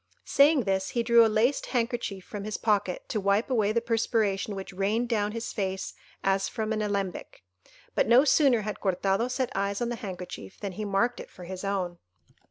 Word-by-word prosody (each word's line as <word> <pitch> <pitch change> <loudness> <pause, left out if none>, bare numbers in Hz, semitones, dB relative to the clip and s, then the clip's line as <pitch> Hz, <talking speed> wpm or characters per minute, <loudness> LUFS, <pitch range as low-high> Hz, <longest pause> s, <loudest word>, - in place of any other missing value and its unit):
Saying 285 0 +5
this, 190 -1 0
he 235 - -1
drew 235 0 +6
a 225 - +4
laced 225 +6 +1
handkerchief 235 -6 -2
from 205 -2 -6
his 215 0 -3
pocket 205 -4 0
to 215 - -1
wipe 200 +6 +1
away 215 -4 +2
the 235 +1 +1
perspiration 220 -3 0
which 195 -1 -7
rained 205 +6 0
down 210 -3 +1
his 230 +1 -5
face 190 -2 -3 0.3
as 195 0 +1
from 220 -1 -2
an 215 - -1
alembic; 200 - -3 0.5
but - - +2
no 245 +5 +6
sooner 270 -6 +4
had 210 0 -5
Cortado 195 +4 +1
set 255 0 -1
eyes 200 +1 -1
on 240 - -1
the 240 - -3
handkerchief, 180 - -8
than 200 - -4
he 210 +3 -5
marked 205 +5 +1
it - - -9
for 180 - -12
his 185 +2 -7
own. 185 -3 -2
210 Hz, 195 wpm, -28 LUFS, 195-235 Hz, 0.5 s, drew